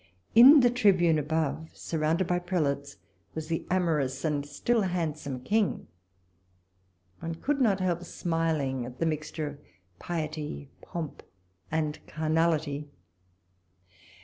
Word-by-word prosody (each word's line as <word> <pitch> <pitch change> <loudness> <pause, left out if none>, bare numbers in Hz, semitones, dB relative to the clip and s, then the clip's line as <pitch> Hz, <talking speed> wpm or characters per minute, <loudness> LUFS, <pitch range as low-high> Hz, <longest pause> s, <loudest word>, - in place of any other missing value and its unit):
In 265 +5 +10
the 245 -1 +4
Tribune 185 -9 +4
above, 160 +1 -2
surrounded 160 +3 0
by 175 0 +1
prelates, 145 -6 -2 0.4
was 160 0 -5
the 165 - -2
amorous 155 -7 0
and 150 -2 0
still 215 +11 0
handsome 155 -8 -2
King. 210 - 0 1.3
One 165 0 -4
could 275 - -1
not 205 -6 +3
help 180 -2 0
smiling 160 -7 -1
at 125 +1 -8
the 165 - 0
mixture 155 0 -2
of 145 0 -8 0.4
piety, 155 -4 -4
pomp, 165 -4 -6 0.5
and 155 -1 -1
carnality. 155 -2 0
160 Hz, 115 wpm, -28 LUFS, 150-175 Hz, 1.3 s, In